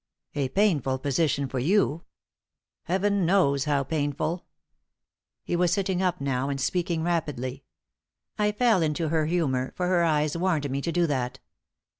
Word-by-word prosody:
"A 140 -2 -1
painful 150 - +2
position 140 0 0
for 130 0 -3
you." 170 +2 +1 0.8
"Heaven 195 +2 +1
knows 160 -6 +3
how 145 -2 +1
painful!" 155 +3 -2 1.0
He - - -2
was 175 -1 +2
sitting 190 -1 0
up 180 -1 0
now, 135 -1 -1
and 140 -1 -2
speaking 170 +3 -1
rapidly. 145 -6 -2 0.7
"I 210 0 +1
fell 220 -3 +3
into 155 0 0
her 155 -1 +1
humour, 135 -7 0
for 180 - -1
her 180 -1 +3
eyes 150 -2 +1
warned 170 -4 0
me 140 +1 -1
to 170 - -2
do 175 0 +2
that. 130 -5 -2
160 Hz, 150 wpm, -26 LUFS, 140-180 Hz, 1.0 s, knows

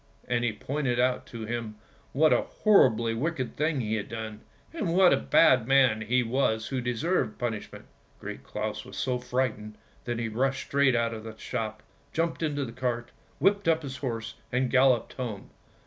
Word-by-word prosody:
" - - -30
And 120 -1 0
he 120 - +1
pointed 125 +2 -2
out 125 0 +1
to 115 -2 -7
him 115 -1 -4 0.4
what 155 +3 +4
a - - +3
horribly 115 - +3
wicked 130 +1 -2
thing 150 -2 0
he 110 -1 -2
had 105 - -5
done, 110 -1 -6 0.3
and 190 - -1
what 185 -1 +6
a - - +6
bad 130 -7 +4
man 130 -5 +4
he 125 +4 +2
was 115 -2 0
who 130 -2 -2
deserved 125 +2 -1
punishment. 110 -4 -4 0.3
Great 65 - -7
Claus 105 +7 -4
was - - -11
so 125 -2 0
frightened 125 -4 -2 0.3
that 120 -1 -2
he 115 0 -2
rushed 135 +5 -1
straight 140 -2 +3
out 115 0 +1
of 110 -1 -7
the 110 -1 -9
shop, 110 -1 -4 0.3
jumped 165 +1 -1
into 145 -3 -1
the 115 - -7
cart, 120 -1 -3 0.3
whipped 200 -2 +2
up 160 -1 +3
his 135 -2 -6
horse 115 -3 -4 0.2
and 125 0 0
galloped 130 -3 +3
home. 115 -6 -6
125 Hz, 185 wpm, -28 LUFS, 110-135 Hz, 0.4 s, what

